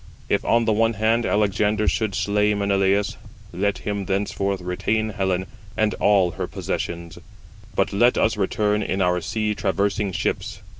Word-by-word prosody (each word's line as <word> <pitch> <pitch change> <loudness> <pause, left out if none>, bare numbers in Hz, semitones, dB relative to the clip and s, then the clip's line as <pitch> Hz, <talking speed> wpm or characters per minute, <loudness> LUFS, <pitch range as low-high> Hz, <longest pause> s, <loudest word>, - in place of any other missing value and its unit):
If, - - +1
on 115 0 +2
the 110 - +2
one 115 +2 +2
hand, 110 +2 +1
Alexander 105 +1 +1
should 110 -4 0
slay 105 0 +1
Menelaus, 100 0 +1 0.4
let 100 -1 0
him 100 -1 -3
thenceforth 100 0 -1
retain 95 +5 -1
Helen 95 -3 -1 0.3
and 110 -1 +2
all 95 -4 +4
her 80 - -4
possessions; 85 -1 -4 0.6
but - - +1
let 120 +5 +4
us 110 - +2
return 105 +1 0
in 95 - -2
our 90 -1 +2
sea 105 +5 -1
traversing 100 0 0
ships. - - -3
100 Hz, 150 wpm, -23 LUFS, 95-105 Hz, 0.6 s, all